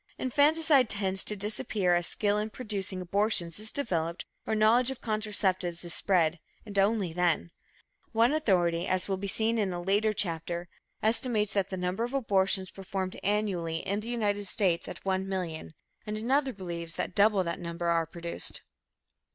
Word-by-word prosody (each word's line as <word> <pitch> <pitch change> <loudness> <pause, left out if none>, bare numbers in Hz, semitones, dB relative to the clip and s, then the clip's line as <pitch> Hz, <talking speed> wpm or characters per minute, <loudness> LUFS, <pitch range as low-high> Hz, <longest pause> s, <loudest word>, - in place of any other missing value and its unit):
Infanticide 290 -1 +3
tends 195 -2 +1
to 210 - -1
disappear 205 -2 +1
as 175 -1 +2
skill 205 +5 +2
in 215 +1 -2
producing 205 -5 -3
abortions 195 -2 +1
is 215 +1 -4
developed 170 - -2 0.2
or 220 - 0
knowledge 230 +4 +4
of 265 - -5
contraceptives 195 -5 0
is 170 - 0
spread, 170 -4 +2 0.3
and 200 -2 -2
only 195 -4 +1
then. 175 -1 0 0.6
One 230 +4 +3
authority, 180 - +1
as 185 -1 0
will 195 -1 -1
be 200 +1 -4
seen 225 +3 +2
in 200 -3 0
a 175 - -4
later 200 +4 +2
chapter, 170 -3 -1 0.3
estimates 220 -1 +1
the 195 -1 -1
number 180 +4 -2
of 245 +3 -3
abortions 190 -6 +2
performed 190 -1 -5
annually 190 -5 -1
in 200 +2 0
the 220 +2 -7
United 205 -4 -1
States 185 -5 0
at - - -9
1,000,000, 190 -4 -3 0.3
and 210 0 -3
another 265 +5 +1
believes 170 -5 -6
that - - -3
double 205 -1 +4
that 170 -1 -4
number 170 0 -5
are 165 -1 +1
produced. 170 +1 -4
195 Hz, 160 wpm, -29 LUFS, 175-215 Hz, 0.6 s, knowledge